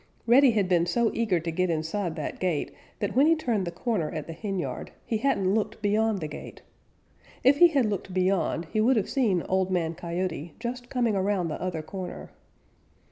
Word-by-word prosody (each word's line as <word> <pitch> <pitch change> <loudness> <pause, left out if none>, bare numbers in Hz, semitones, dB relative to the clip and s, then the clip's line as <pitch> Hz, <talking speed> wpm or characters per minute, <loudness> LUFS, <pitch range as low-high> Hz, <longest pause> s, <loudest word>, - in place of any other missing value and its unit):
Reddy 260 +3 +6
had 210 -5 +2
been 175 -2 +2
so 230 +5 +2
eager 215 -7 +1
to 165 +1 -3
get 185 +2 0
inside 165 +2 -2
that 155 -3 -5
gate 175 -6 -1 0.3
that 205 +1 -3
when 275 +4 +5
he 330 - +5
turned 230 - -1
the - - -2
corner 175 -2 -1
at 155 -2 -5
the 165 - -7
henyard 195 +1 -4 0.2
he 225 - 0
hadn't 200 -6 +1
looked 215 -1 -1
beyond 215 -1 +1
the 155 - -2
gate. 150 - -9 0.8
If 270 +3 +5
he 345 - +9
had 280 -7 +2
looked 200 -2 -3
beyond, 185 -2 +1
he 215 - +2
would 255 +4 +4
have 210 - 0
seen 215 - +2
Old 190 0 0
Man 170 -3 0
Coyote 170 -1 -4
just 245 +1 -5
coming 240 -5 +1
around 190 -3 0
the 155 - -5
other 175 -3 -3
corner. 185 +3 -7
190 Hz, 195 wpm, -27 LUFS, 170-225 Hz, 0.8 s, he